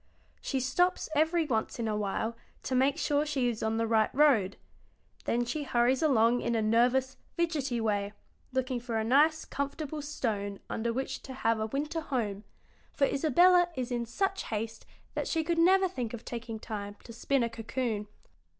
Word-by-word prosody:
She 270 - -1
stops 355 +8 +1
every 320 +2 +3
once 225 -6 -1
in 230 -2 -2
a 215 - 0
while 210 +2 -2 0.3
to - - -3
make 270 +3 +3
sure 295 -3 +1
she 275 -5 0
is 225 -2 -4
on 220 0 0
the 230 - +1
right 220 -1 +3
road; 245 -10 +4 0.7
then 240 +1 +1
she 270 +6 -3
hurries 250 -1 +2
along 245 -5 +4
in 235 0 0
a 225 - +2
nervous, 245 +4 +2 0.2
fidgety 295 -8 0
way, 205 -2 -1 0.4
looking 260 -1 -1
for 235 -1 -3
a 220 - 0
nice, 295 +7 +3
comfortable 285 +2 -4
stone 210 -9 -3
under 230 +1 -1
which 265 +3 -3
to 265 - -8
have 225 -3 +1
a 220 - -1
winter 300 +7 -2
home, 215 -9 -2 0.5
for 280 - +2
Isabella 350 +6 +4
is 255 -1 -3
in 240 -1 -2
such 390 - -1
haste 220 +1 -4 0.3
that - - -2
she 325 -2 0
could 335 +1 0
never 380 +3 +5
think 245 -9 -4
of 235 - -12
taking 235 -1 -5
time 205 -2 -6
to 230 - -10
spin 260 +2 +1
a 235 - 0
cocoon." 225 -2 -3
245 Hz, 180 wpm, -30 LUFS, 225-295 Hz, 0.7 s, never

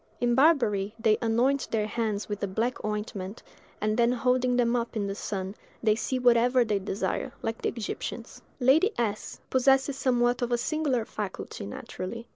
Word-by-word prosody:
In 240 0 +2
Barbary 235 -8 +3
they 220 -2 +3
anoint 245 +4 +2
their 215 -2 0
hands 215 -1 -2
with 205 -1 -4
a 200 - 0
black 225 +6 -2
ointment, 210 -1 -4 0.4
and 215 +1 0
then 235 0 +4
holding 250 0 +2
them 240 0 +2
up 235 0 -2
in 210 -2 0
the 195 - -2
sun, 195 -2 -4 0.3
they 215 -1 +5
see 230 +4 -2
whatever 245 0 +4
they 210 -2 0
desire, 205 +6 -2
like 225 0 -3
the - - +1
Egyptians. 230 -3 -6 0.2
Lady 280 - +5
S—— 215 -3 -2
possesses 270 +1 +3
somewhat 245 -1 +2
of 245 0 -1
a 240 - +3
singular 265 -3 0
faculty, 200 - -6
naturally. 185 - -6
235 Hz, 170 wpm, -28 LUFS, 210-250 Hz, 0.4 s, they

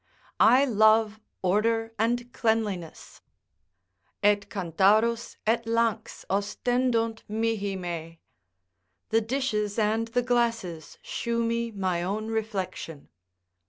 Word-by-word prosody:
I 265 +3 +6
love 220 -2 +3 0.2
order 225 +4 +1
and 240 +2 0
cleanliness 215 -9 -2 1.0
"Et 205 0 +3
cantharus 205 +6 +2
et 230 +2 +2
lanx 230 -1 -1
Ostendunt 230 +3 0
mihi 215 -2 -1
me" 165 -3 -6 0.9
["The 225 +1 +3
dishes 220 -4 -1
and 220 +1 +1
the 245 +2 0
glasses 230 -10 -1
shew 235 0 -2
me 230 0 -1
my 190 -5 -1
own 210 +5 -3
reflection." 200 -8 -4
220 Hz, 95 wpm, -27 LUFS, 200-230 Hz, 1.0 s, I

